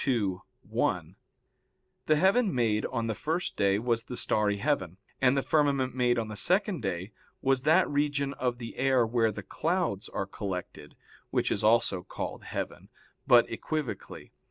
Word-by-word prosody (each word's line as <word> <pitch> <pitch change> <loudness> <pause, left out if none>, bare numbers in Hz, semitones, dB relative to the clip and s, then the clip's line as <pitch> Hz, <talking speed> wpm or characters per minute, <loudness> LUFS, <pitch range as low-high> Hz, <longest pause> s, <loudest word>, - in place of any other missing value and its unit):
ii, 105 -8 +1 0.3
1] - - -1 0.9
the 155 - +5
heaven 195 +7 +3
made 110 -3 +1
on 115 -3 -2
the 115 - -1
first 165 - -2
day 100 0 +2
was 115 +1 -1
the 125 - -6
starry 105 -1 +1
heaven, 95 - -1 0.2
and 130 +1 +4
the 135 - +1
firmament 140 -4 +2
made 125 -1 +2
on 115 -1 -1
the 110 - -6
second 190 - +2
day 95 0 -3 0.3
was 135 -1 +2
that 160 +7 +4
region 145 -1 0
of 125 -2 -2
the 115 -1 -8
air 130 -2 +3
where 115 -1 +2
the 100 -1 -7
clouds 165 - -1
are 100 - -3
collected, 90 -7 -6 0.3
which - - 0
is - - 0
also 110 -4 +3
called 90 - -6
heaven, - - -5 0.4
but 120 -1 +6
equivocally. 150 +3 -5
120 Hz, 160 wpm, -29 LUFS, 105-145 Hz, 0.9 s, but